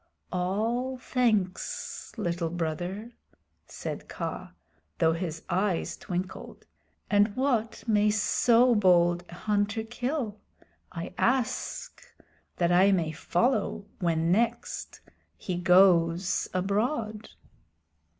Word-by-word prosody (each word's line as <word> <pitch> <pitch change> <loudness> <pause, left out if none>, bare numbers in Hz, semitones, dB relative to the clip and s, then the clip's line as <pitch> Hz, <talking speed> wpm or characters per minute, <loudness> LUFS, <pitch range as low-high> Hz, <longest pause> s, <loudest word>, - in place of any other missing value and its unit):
"All 225 +8 -1
thanks, 245 - -1
Little 170 -5 -1
Brother," 175 +6 -4 0.6
said - - -6
Kaa, - - -5 0.4
though 160 -1 +3
his 165 -2 -4
eyes 185 0 0
twinkled. 185 -1 -6 0.5
"And 205 0 +3
what 250 -4 0
may 210 -1 +3
so 235 +3 +4
bold 175 -4 +4
a 175 - -9
hunter 210 +3 0
kill? 240 -1 -3 0.5
I 170 0 -6
ask 250 -1 -1 0.6
that 175 -1 +2
I 185 +3 +5
may 170 -5 +1
follow 200 - 0
when 165 -1 +1
next 235 +4 -1 0.4
he 185 - -4
goes 180 -1 +4
abroad." 215 +3 -1
200 Hz, 95 wpm, -28 LUFS, 175-225 Hz, 0.6 s, I